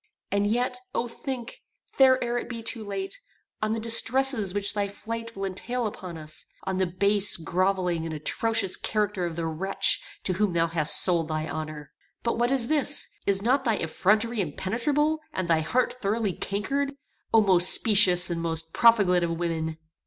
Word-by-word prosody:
And 200 0 +1
yet, 245 +3 -1 0.2
O 240 - -1
think, 240 0 -7 0.3
think 260 -1 +5
ere 240 0 -2
it - - -8
be 230 -2 -6
too 225 0 -2
late, 200 - -6 0.4
on 215 0 0
the 225 - -2
distresses 230 -1 +4
which 200 +1 -1
thy 205 -1 -1
flight 230 +3 -7
will 195 0 -4
entail 235 +6 -3
upon 185 -5 -6
us; 155 -1 -5 0.2
on 190 -1 -3
the 190 -1 +1
base, 200 +3 +2
grovelling, 180 0 -1
and 165 - -5
atrocious 195 +6 0
character 210 -4 -1
of 165 - -7
the 165 0 -3
wretch 170 +5 +1 0.2
to 185 - +1
whom 200 0 0
thou 165 -1 +2
hast 165 -2 +2
sold 170 -3 +1
thy 155 0 -3
honor. 155 -1 -7 0.3
But 235 0 -1
what 240 0 +2
is 260 -3 +1
this? 290 -1 +1 0.2
Is 200 0 +2
not 260 +4 +2
thy 230 -4 +1
effrontery 210 +7 0
impenetrable, 260 - -1
and 185 -2 -3
thy 165 -1 +3
heart 250 +9 -1
thoroughly 210 -1 -1
cankered? 275 +11 -2 0.4
O 225 - +6
most 185 -4 +5
specious, 190 -5 +5
and 165 -1 -3
most 165 -1 -3
profligate 200 -7 +4
of 165 -1 -2
women!" 160 -2 -3
200 Hz, 175 wpm, -26 LUFS, 175-230 Hz, 0.4 s, O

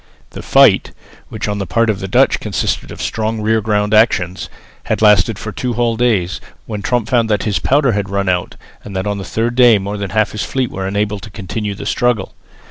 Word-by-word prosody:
The - - -8
fight, - - +4 0.4
which 110 -1 -4
on 105 0 -2
the 100 - -3
part 115 +7 +1
of 105 -3 0
the 95 - -4
Dutch 95 - +3
consisted - - -2
of - - -7
strong 110 0 -2
rear 110 +1 +1
guard 105 0 0
actions, 95 -5 +2 0.4
had - - -1
lasted 105 0 +4
for 105 - -6
two 125 +3 -3
whole 120 0 0
days, 110 -7 0 0.2
when 105 -2 -5
Tromp 120 +1 -1
found 120 -2 +1
that 105 -2 +1
his 105 -3 0
powder 140 -2 +2
had 100 -2 -2
run 100 0 -1
out 90 -1 -1 0.3
and 100 - -9
that 95 +1 -2
on 105 -1 -2
the - - -5
third 115 +6 -2
day 120 -3 +6
more 100 +1 -4
than 100 -1 -4
half 110 -1 +1
his 105 - -4
fleet 130 -2 -2
were 95 0 -4
unable 105 +1 -1
to 100 - -10
continue 105 +1 -5
the - - -8
struggle. 120 -6 0
105 Hz, 220 wpm, -16 LUFS, 100-115 Hz, 0.4 s, day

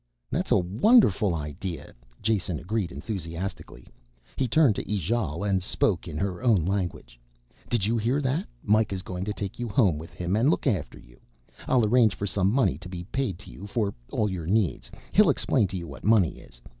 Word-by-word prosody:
"That's - - -1
a - - +6
wonderful 105 - +4
idea," 75 +2 -6 0.3
Jason 100 -6 0
agreed 100 +1 -2
enthusiastically. 90 -2 -6 0.5
He 130 - 0
turned 140 -1 +4
to - - -4
Ijale 100 -3 -1
and 95 -2 +1
spoke 90 0 0
in 80 -3 -5
her 95 +2 -2
own 110 -10 +3
language. 85 -11 -3 0.5
"Did 115 -5 +1
you 115 +2 +1
hear 120 +6 +1
that? 135 +1 -1 0.2
Mikah 105 -1 +2
is 95 - -5
going 90 0 -5
to 105 - -2
take 100 0 -6
you 120 -1 -3
home 100 - +3
with 80 - -9
him 90 +2 -2
and 120 +6 +3
look - - 0
after 90 -8 -1
you. - - -18 0.5
I'll 125 -4 +3
arrange 110 -2 +4
for 100 - -3
some 95 -1 +1
money 105 - +2
to 95 0 -10
be 90 -1 -6
paid 130 -10 -1
to - - -11
you 100 - -9
for 105 -1 -1 0.2
all 105 - +1
your 90 -5 -4
needs, 100 -2 0 0.2
he'll 210 -4 +5
explain 130 -5 +2
to 95 +1 -5
you 85 -1 -6
what 70 - -10
money 105 -6 +3
is. - - -16
100 Hz, 195 wpm, -26 LUFS, 90-115 Hz, 0.5 s, a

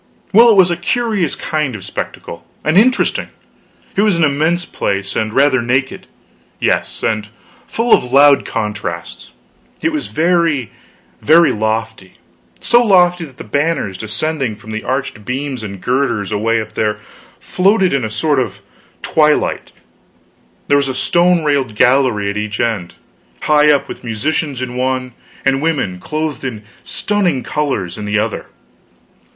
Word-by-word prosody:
Well, 235 +4 +7
it 220 - +5
was 185 -2 +5
a 170 - -1
curious 205 - -1
kind 150 -6 -2
of 95 -3 -8
spectacle, - - -6 0.2
and 155 - +1
interesting. 245 +6 +3 0.7
It - - +2
was 210 -4 +2
an 170 - +2
immense 160 +4 +1
place, 100 0 -3
and 110 0 -1
rather 135 +1 +3
naked 130 +3 -1 0.5
yes, - - -1
and 110 -1 -1 0.4
full 230 +1 +1
of - - +4
loud 140 +1 +6
contrasts. 105 -1 -5 0.5
It 320 - 0
was 305 -1 -3
very, 165 - +1 0.5
very 165 +3 +5
lofty; 110 -3 -3 0.5
so 240 0 +4
lofty 180 -5 +3
that 135 -4 -16
the - - -8
banners 145 - -1
depending 115 +4 -2
from 110 +1 -12
the 110 0 -4
arched 130 -5 -3
beams 130 +2 -4
and 100 -3 -7
girders 120 -3 -1
away 115 +2 +1
up 110 -1 -6
there 105 -1 -1 0.4
floated 190 -1 +2
in 135 -3 0
a 110 - -2
sort 140 +6 0
of 130 - -3 0.5
twilight; 150 -1 +1 1.0
there 145 - +4
was 140 -1 +1
a 130 - -3
stone 170 +6 +2
railed 140 -7 0
gallery 125 -4 +3
at 100 - -5
each 105 +1 -4
end, 110 -8 -2 0.5
high 150 0 +4
up, 145 - +1
with - - -9
musicians 130 +4 -2
in 130 - -4
the 125 - -7
one, 130 -1 -2 0.3
and 135 0 +2
women, 140 - -1
clothed 155 +5 -4
in 115 -5 -5 0.2
stunning 185 -10 -1
colors, 110 - -2
in 105 - -5
the 105 +1 0
other. 110 0 -2
135 Hz, 155 wpm, -16 LUFS, 110-160 Hz, 1.0 s, Well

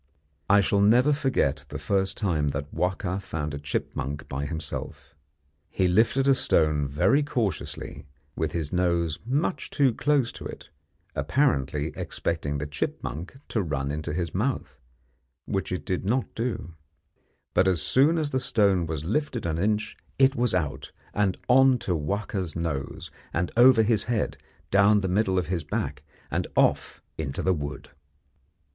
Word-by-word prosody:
I 100 +1 +6
shall 100 +1 +2
never 125 +8 +5
forget 105 - 0
the - - -5
first 95 -1 0
time 80 -8 0
that 70 +1 -3
Wahka 90 +1 -1
found 75 -5 -4
a 70 - -4
chipmunk 70 +1 -3
by 70 +1 -3
himself. 80 0 -6 0.6
He 95 - +1
lifted 110 +8 +3
a 135 - +7
stone 75 - +2
very 75 - +3
cautiously, 115 - -3 0.3
with - - -1
his 80 -2 -3
nose 85 -3 +1
much 145 +8 -1
too 135 -5 +3
close 145 -1 +1
to - - -10
it, - - -10 0.4
apparently 75 - +1
expecting 75 -4 -2
the 75 - -3
chipmunk 75 - -4
to 110 - 0
run 70 -5 -2
into 75 0 -3
his 85 0 -2
mouth, 105 - -2 0.7
which 95 -3 -2
it 90 - -3
did 90 - -1
not 120 +6 0
do; 115 -7 -3 0.8
but 95 - +4
as 90 -3 +2
soon 145 +6 +3
as 150 -2 -1
the 130 - +1
stone 100 -8 +2
was 80 -2 -3
lifted 125 - -1
an 80 -1 -1
inch 105 +2 0 0.2
it 135 0 +5
was 120 -5 +1
out 75 -3 -2 0.2
and 100 -3 +1
on 130 +1 +6
to 90 -6 -1
Wahka's 95 +1 -2
nose, 80 -5 -4 0.2
and 85 +1 -1
over 120 -1 +7
his 110 -2 +1
head, 120 -3 -1 0.4
down 100 +1 +5
the 95 - -1
middle 95 0 +1
of 90 - +1
his 85 -1 -2
back, 75 - -3 0.3
and - - -1
off - - +2 0.2
into 70 -4 -3
the 95 - +3
wood. 75 -2 -5
95 Hz, 155 wpm, -26 LUFS, 75-115 Hz, 0.8 s, a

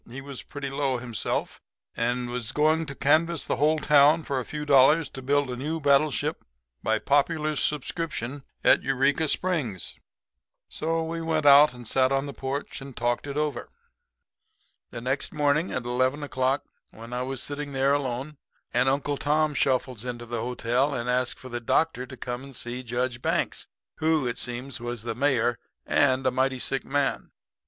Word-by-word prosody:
He 125 +3 -7
was 135 -1 -7
pretty 140 -1 -6
low 135 -2 0
himself, 120 -2 -3 0.3
and 120 +1 -1
was 120 -1 -3
going 155 +3 +2
to 140 - -6
canvass 160 +4 +2
the - - -1
whole 155 +4 +3
town 150 +1 +5
for 140 -3 -2
a 125 - -5
few 150 -1 -5
dollars 145 +2 +5
to 135 - -8
build 140 0 +1
a - - -3
new 150 +6 -3
battleship 140 -2 +2 0.4
by 110 0 +1
popular 150 +4 +1
subscription 145 -2 0 0.2
at - - +5
Eureka 135 +4 +1
Springs. 145 - -1 0.7
So 165 +1 -1
we 165 +1 -4
went 160 -2 0
out 145 -1 +8
and 120 -2 -10
sat 130 +2 +2
on 135 +1 +1
the 140 - -6
porch 135 +2 -4
and 135 -2 -10
talked 120 +3 -1
it 140 0 -4
over. 150 -4 -2 1.2
"The 120 - -7
next 130 +3 -2
morning 150 +4 +2
at 125 - -3
eleven 130 +4 0
o'clock 130 -1 0 0.3
when 115 +2 -11
I 125 - -2
was 130 0 -2
sitting 145 0 -4
there 135 +1 +2
alone, 140 +1 -2 0.4
an 125 +2 +3
Uncle 140 +1 0
Tom 150 +1 +1
shuffles 130 -4 0
into 120 -1 -5
the 120 -1 -3
hotel 125 +3 0
and 120 0 -3
asked 125 0 0
for 130 - -11
the 120 0 -4
doctor 130 +1 +1
to 130 - -10
come 125 +1 -5
and 135 -1 -11
see 120 +2 -3
Judge 120 0 -2
Banks, - - -1 0.3
who, 160 -3 +2
it 120 -1 -2
seems, 125 +2 -4
was 120 -2 -5
the 120 - -3
mayor 120 -2 +1 0.3
and 130 -2 +2
a 130 - +3
mighty 130 +1 +1
sick 135 +2 -1
man. 140 0 -1
135 Hz, 180 wpm, -26 LUFS, 125-145 Hz, 1.2 s, out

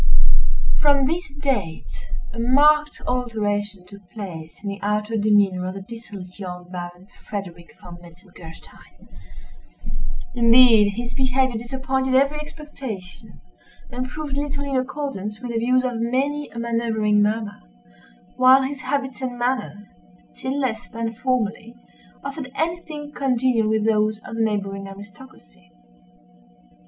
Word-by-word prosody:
From 285 -2 +4
this 335 +2 -1
date 245 - -2 0.3
a 230 - -6
marked 295 +5 +4
alteration 205 -5 -1
took 200 +2 -13
place 170 -8 -7
in 200 - -2
the 200 0 -5
outward 210 +1 0
demeanor 200 -3 +3
of 185 - -4
the 195 - -6
dissolute 205 -4 -10
young 180 -2 -7
Baron 175 0 -7 0.2
Frederick 175 -5 -6
Von 175 -1 -10
Metzengerstein. 175 -1 -14 1.3
Indeed, 230 -3 +7
his 240 +1 -4
behavior 260 -1 +2
disappointed 265 +3 -1
every 280 +3 +4
expectation, 260 - -8 0.5
and 255 +1 -3
proved 295 -2 -4
little 285 0 -2
in 280 -1 -2
accordance 255 -6 -2
with 245 -1 -5
the 230 - 0
views 255 +2 +3
of 250 -2 -1
many 270 +5 0
a - - -12
manoeuvering 230 -3 +2
mamma; 210 0 0 0.8
while 260 +1 +7
his 270 0 -3
habits 265 0 -2
and 250 -2 -3
manner, 240 -5 -1 0.4
still 265 - -3
less 245 -3 -2
than 230 -1 -3
formerly, 230 -2 -1 0.5
offered 275 -1 -5
any 335 +3 0
thing 295 -2 -7
congenial 250 -5 +2
with 220 -1 +2
those 215 -1 +3
of - - -7
the 225 - -1
neighboring 195 -2 -1
aristocracy. 190 - -14
230 Hz, 130 wpm, -23 LUFS, 205-265 Hz, 1.3 s, Indeed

